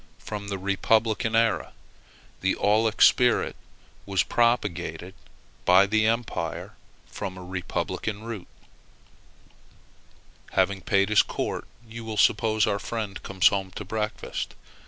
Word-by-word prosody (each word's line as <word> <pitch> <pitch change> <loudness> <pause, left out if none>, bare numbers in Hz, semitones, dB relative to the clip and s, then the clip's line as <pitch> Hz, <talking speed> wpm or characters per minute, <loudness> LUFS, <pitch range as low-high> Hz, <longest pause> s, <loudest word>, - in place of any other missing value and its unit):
from 105 -1 -7
the 100 -1 -3
republican 110 +4 +1
era. 115 0 +1 0.7
The 95 - +1
aulic 110 +2 +3
spirit 125 -2 +4 0.5
was 100 -1 +2
propagated 95 -7 0 0.5
by 95 +2 +6
the 110 +2 +2
Empire, 110 -8 -2 0.3
but - - -24
from 95 0 -5
a 90 - -8
republican 95 +3 -4
root. 110 -6 -6 2.1
Having 95 +1 +1
paid 100 +2 +2
his 105 - +6
court, - - -4 0.2
you 115 +1 -8
will 110 -1 -5
suppose 110 +1 +3
that - - +1
our 100 - -1
friend 105 -4 -4
comes 95 -2 +3
home 95 -2 -2
to 105 - -6
breakfast. 105 +2 -4
105 Hz, 125 wpm, -26 LUFS, 95-110 Hz, 2.1 s, by